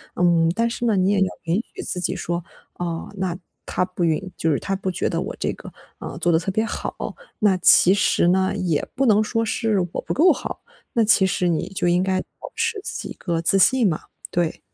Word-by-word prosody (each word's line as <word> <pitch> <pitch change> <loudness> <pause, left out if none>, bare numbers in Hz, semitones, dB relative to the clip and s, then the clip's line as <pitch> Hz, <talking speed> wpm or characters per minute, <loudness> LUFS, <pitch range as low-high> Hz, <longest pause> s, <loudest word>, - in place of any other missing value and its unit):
嗯， 170 -2 +3
但 230 +4 +1
是 240 +1 -3
呢， 220 -4 +2
你 185 +1 +3
也 205 - +2
要 190 - +4 0.2
允 165 0 0 0.2
许 - - -6
自 185 - -3
己 - - -1
说， 175 0 -3 0.3
哦， 170 -2 -4
那 185 -2 -2 0.3
他 180 - 0
不 180 -1 -4
允 170 +3 0
就 165 - +1
是 145 - +1
他 195 - -2
不 190 0 -3
觉 180 - -1
得 - - -1
我 - - -5
这 - - -1
个， - - -11 0.3
呃， - - -7
做 175 - +2
得 160 - +4
特 185 +3 -3
别 220 +3 0
好， - - -4 0.4
那 205 -4 +3
其 180 +1 +6
实 200 -3 +2
呢， 190 +2 +2
也 175 -7 -1
不 270 +1 +1
能 215 -3 +5
说 225 +1 -1
是 220 -2 0
我 - - -2
不 - - -3
够 340 +7 +5
好， - - -7 0.3
那 230 - +3
其 210 -2 +5
实 180 -1 0
你 170 +1 -1
就 190 -2 -2
应 175 +1 +3
该 190 -1 0
保 - - -12
持 420 - -1
自 - - -4
己 - - -7
一 - - -6
个 170 -3 -3
自 180 +4 +3
信 240 +2 +5
嘛， 155 - -1 0.3
对。 170 -2 -1
185 Hz, 250 characters per minute, -22 LUFS, 175-210 Hz, 0.4 s, 其